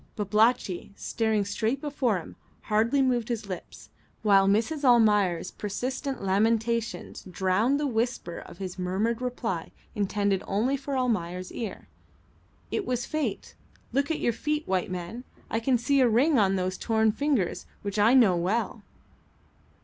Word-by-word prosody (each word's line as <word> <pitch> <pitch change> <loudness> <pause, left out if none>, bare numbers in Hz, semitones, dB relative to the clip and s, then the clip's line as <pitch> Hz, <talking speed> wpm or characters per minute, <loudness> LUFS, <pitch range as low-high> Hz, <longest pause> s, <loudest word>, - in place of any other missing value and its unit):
Babalatchi, 210 -2 +1
staring 220 -2 0
straight 220 +6 -1
before 275 -7 0
him, 170 - -9 0.3
hardly 230 +6 +2
moved 245 -3 +1
his 230 -3 -2
lips, 185 -3 -8 0.3
while 195 -2 +5
Mrs. 230 +10 +1
Almayer's 210 -8 +4
persistent 255 +4 -4
lamentations 225 +4 0
drowned 190 - +1
the 295 - 0
whisper 235 -7 -2
of - - -12
his 185 -1 -6
murmured 205 +6 -1
reply 230 -8 -3 0.2
intended 200 -1 0
only 230 +8 +1
for 275 0 -3
Almayer's 185 -8 -1
ear. 225 -4 -6 0.8
"It 420 - -1
was 245 -1 -1
fate. 310 -1 -3 0.4
Look 280 +2 +1
at 320 - -1
your 235 - +1
feet, 300 +6 -2
white 185 -2 0
man. 185 +7 -5 0.3
I 225 - +1
can 245 +2 +2
see 270 +4 +2
a 250 - +5
ring 260 +5 +4
on 195 -2 +3
those 185 0 -2
torn 220 -1 +2
fingers 260 - -1 0.2
which 200 0 -3
I 225 +5 +5
know 220 -8 +6
well." 205 +5 -1
220 Hz, 145 wpm, -27 LUFS, 195-250 Hz, 0.8 s, know